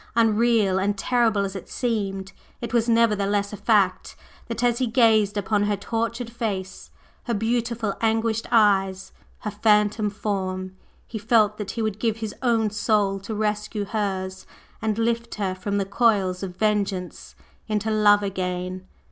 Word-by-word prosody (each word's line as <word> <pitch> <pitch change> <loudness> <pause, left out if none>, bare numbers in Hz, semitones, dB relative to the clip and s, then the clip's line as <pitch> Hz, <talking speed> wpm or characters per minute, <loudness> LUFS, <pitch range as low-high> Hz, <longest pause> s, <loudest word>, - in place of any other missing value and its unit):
Unreal 225 -3 +3
and 200 +1 0
terrible 225 -2 +2
as 195 0 -6
it 195 - -8
seemed, 200 -5 -2 0.3
it 235 -1 -6
was 235 0 +2
nevertheless 205 -3 +2
a - - -3
fact, 205 -3 +1 0.3
that 230 0 -4
as 240 -1 +2
he 255 - +1
gazed 220 -3 +3
upon 205 +1 +1
her 205 0 +1
tortured 230 +3 -3
face, 200 -5 -4 0.4
her 235 - -1
beautiful 230 0 -1
anguished 225 0 0
eyes, 195 -3 +3 0.3
her 210 - -3
phantom 210 0 +2
form, 190 -2 -3 0.3
he 220 - -6
felt 215 -1 +2
that 205 -2 -4
he 225 - 0
would 215 -1 -2
give 225 -1 0
his 220 -2 -5
own 225 -4 +2
soul 205 -2 +1
to 215 +3 -6
rescue 210 0 -2
hers 190 -3 -3 0.3
and 220 -1 -1
lift 235 +1 -1
her 195 -3 -1
from 200 +2 -3
the 200 - 0
coils 195 -3 +1
of 185 -2 -6
vengeance 195 - -2 0.3
into 215 +1 0
love 205 -1 +4
again! 185 -1 -3
210 Hz, 155 wpm, -24 LUFS, 195-225 Hz, 0.4 s, love